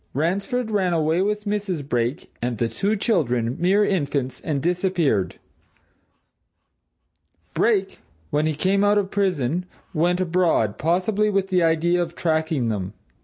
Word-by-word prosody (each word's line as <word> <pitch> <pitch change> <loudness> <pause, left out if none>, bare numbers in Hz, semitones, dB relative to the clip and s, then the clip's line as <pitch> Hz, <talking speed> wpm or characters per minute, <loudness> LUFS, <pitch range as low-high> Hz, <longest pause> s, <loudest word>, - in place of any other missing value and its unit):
Ransford 200 - -1
ran 190 -4 +1
away 160 +2 +1
with 210 +2 -1
Mrs. 200 -8 -2
Brake 120 +1 -2
and 120 -1 -2
the 115 - 0
two 200 - -1
children 125 - 0
mere 195 +4 +3
infants 140 -9 -1
and 150 -3 -1
disappeared. 175 - 0 2.2
Brake, 200 -5 +1 0.3
when 150 +1 +1
he 155 - -1
came 195 +6 +1
out 205 0 +4
of 195 -2 0
prison, 180 -4 0 0.3
went 175 +2 +1
abroad 170 - +1
possibly 190 +7 +1
with 195 -1 0
the 185 -2 +2
idea 165 +2 +2
of 170 0 -4
tracking 160 -6 0
them. 100 -2 -3
175 Hz, 135 wpm, -23 LUFS, 145-195 Hz, 2.2 s, out